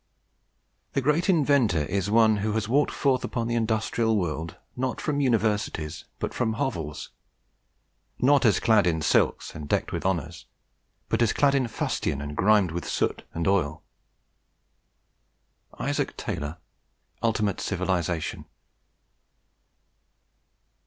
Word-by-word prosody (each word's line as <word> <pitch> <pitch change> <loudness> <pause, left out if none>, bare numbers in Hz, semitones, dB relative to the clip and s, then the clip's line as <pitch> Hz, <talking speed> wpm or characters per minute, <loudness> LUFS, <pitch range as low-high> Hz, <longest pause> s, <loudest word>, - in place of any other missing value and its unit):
"The 140 - +1
great 150 +8 +1
Inventor 140 - +3
is 95 +4 -1
one 110 -1 +4
who 105 +1 -1
has 110 -1 -1
walked 140 +5 +2
forth 130 -3 +1
upon 115 -2 -2
the 120 - -1
industrial 110 0 +1
world, 80 -3 -3 0.2
not 130 0 -2
from 145 -1 -1
universities, 105 - 0
but - - -4
from 115 -3 0
hovels; 85 - -3 1.1
not 140 +2 +4
as 110 -6 +4
clad 105 -5 +4
in 80 -2 0
silks - - +1
and 75 -2 -8
decked - - 0
with - - -3
honours, 85 -3 -2 0.6
but - - 0
as 115 - +3
clad 140 -1 +3
in 135 -3 +2
fustian 90 -9 -2
and 75 +1 -6
grimed 100 -1 +3
with 85 +2 -4
soot - - -1
and 85 0 -1
oil." 80 -6 +1 2.0
ISAAC - - -2
TAYLOR, 75 +3 -4 0.6
Ultimate 110 -4 0
Civilization. 90 -4 -2
105 Hz, 125 wpm, -26 LUFS, 85-120 Hz, 2.0 s, one